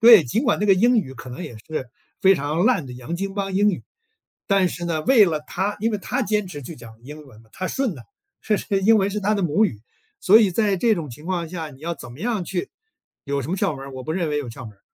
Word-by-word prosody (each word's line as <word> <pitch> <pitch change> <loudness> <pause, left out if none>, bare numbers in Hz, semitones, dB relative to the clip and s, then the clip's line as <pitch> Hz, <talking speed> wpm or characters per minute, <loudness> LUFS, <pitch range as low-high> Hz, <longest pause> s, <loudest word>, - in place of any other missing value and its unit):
对， 225 -7 +9
尽 175 - 0
管 245 - +2
这 210 - +1
个 195 - +6
英 240 +6 +4
语 135 -10 -3
可 125 0 -10
能 125 - -7
也 120 - -8
是 130 +2 -6 0.3
非 195 0 +6
常 150 +3 -1
烂 155 - +2
的 125 - -8
洋 125 +7 -6
经 195 +1 -3
邦 195 -1 -2
英 205 +1 +4
语， 175 - -5 0.6
但 195 -2 +3
是 175 - -6
呢， 160 -2 -1
为 240 -6 +7
了 155 -4 -1
他 200 +3 -2
因 225 +1 +1
为 210 - -1
他 250 +6 -2
坚 210 -2 0
持 145 -5 -7
去 165 - -8
讲 115 -1 -13
英 150 +2 -10
文 110 -4 -16
嘛， 110 - -25
他 185 - -4
顺 265 -8 -1
的， 125 - -11 0.4
是 215 -1 +1
是 195 -1 -1
英 220 +3 +6
文 195 0 +2
是 210 +1 -3
他 210 +2 +1
的 200 - -1
母 175 +7 +3
语。 110 - -2 0.4
所 205 +4 +6
以 205 - +3
在 200 +1 +1
这 225 +4 +3
种 150 -6 -5
情 150 +7 -12
况 175 -3 -2
下 165 -3 -5
你 135 - -15
要 170 +2 -3
怎 120 - -11
么 130 - -13
样 220 -4 -1
去 180 0 -4 0.5
有 140 0 -1
什 135 - -7
么 185 - 0
窍 150 - 0
门 - - -10
儿， 135 - -9
我 130 - -6
不 155 - -5
认 170 -3 -1
为 150 - 0
有 140 -5 -4
窍 125 +2 -9
门 105 - -10
儿， - - -37
175 Hz, 305 characters per minute, -23 LUFS, 145-205 Hz, 0.6 s, 对